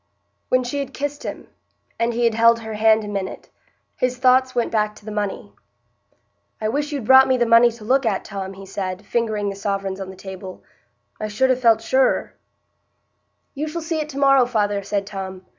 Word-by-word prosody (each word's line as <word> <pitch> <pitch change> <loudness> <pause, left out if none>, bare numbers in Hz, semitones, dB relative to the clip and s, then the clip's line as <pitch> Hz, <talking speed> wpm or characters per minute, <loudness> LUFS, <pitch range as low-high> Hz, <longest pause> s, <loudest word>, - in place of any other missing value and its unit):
When 255 0 +3
she 250 +4 -3
had 275 -1 -5
kissed 290 +1 -4
him, - - -7 0.5
and 230 +1 +1
he 240 +1 -1
had 230 -1 +3
held 230 +1 +4
her 220 -1 -6
hand 220 +1 +3
a - - -6
minute, 200 -2 -5 0.4
his 250 0 -1
thoughts 255 0 +3
went 240 - 0
back 210 -1 0
to 210 - -17
the 215 - -6
money. 205 -2 -4 1.1
"I 215 - -1
wish 290 +5 -2
you'd 280 -6 -4
brought 265 +2 +7
me 260 - +2
the 240 - +2
money 230 +1 +6
to 225 -2 -13
look 265 +5 +2
at, 215 -5 -1
Tom," 195 -2 -6
he 195 0 -11
said, 190 0 -5
fingering 215 -3 -1
the 195 - -5
sovereigns 195 -1 -3
on 190 - -6
the 190 - -10
table; 190 0 -9 0.6
"I 215 - -3
should 255 +5 +2
ha' 250 - -11
felt 225 -2 +4
surer." 260 +2 +1 1.2
"You 300 +2 -3
shall 335 +2 -4
see 325 -1 -2
it 305 0 -3
to 275 - -8
morrow, 275 -3 +5
father," 205 -4 0
said 200 0 -2
Tom. 190 -2 -7
225 Hz, 205 wpm, -21 LUFS, 200-255 Hz, 1.2 s, brought